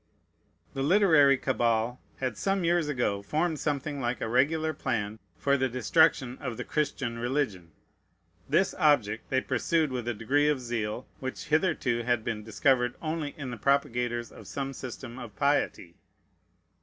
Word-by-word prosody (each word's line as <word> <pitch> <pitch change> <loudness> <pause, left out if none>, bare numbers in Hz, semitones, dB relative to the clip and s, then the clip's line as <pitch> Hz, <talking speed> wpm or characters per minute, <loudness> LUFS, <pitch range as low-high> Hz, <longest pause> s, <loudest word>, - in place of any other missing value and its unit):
The 135 - -3
literary 150 -4 +5
cabal 120 -2 0 0.2
had 130 -3 -2
some 195 -1 0
years 170 -2 +2
ago 120 -8 0
formed 155 +8 -1
something 145 -1 -2
like 120 0 -1
a - - -2
regular 155 +7 +2
plan 110 -6 -2 0.2
for 140 0 +2
the 130 -1 +1
destruction 130 0 +2
of 125 -4 -5
the - - -3
Christian 130 -6 -2
religion. 120 - -1 0.8
This 190 - +3
object 120 - +2
they 130 -1 +2
pursued 150 +4 0
with 125 -2 -4
a 120 - -1
degree 140 +7 +2
of 150 -3 +1
zeal 120 -1 -3
which 130 +3 -6
hitherto 155 -7 +1
had 120 -1 0
been 110 -2 -3
discovered 125 +3 +2
only 155 -2 -3
in 135 -4 -5
the 120 - -5
propagators 120 -3 0
of - - -13
some 135 -1 -4
system 130 -1 -7
of 115 -5 -9
piety. 140 -9 0
130 Hz, 155 wpm, -28 LUFS, 120-150 Hz, 0.8 s, literary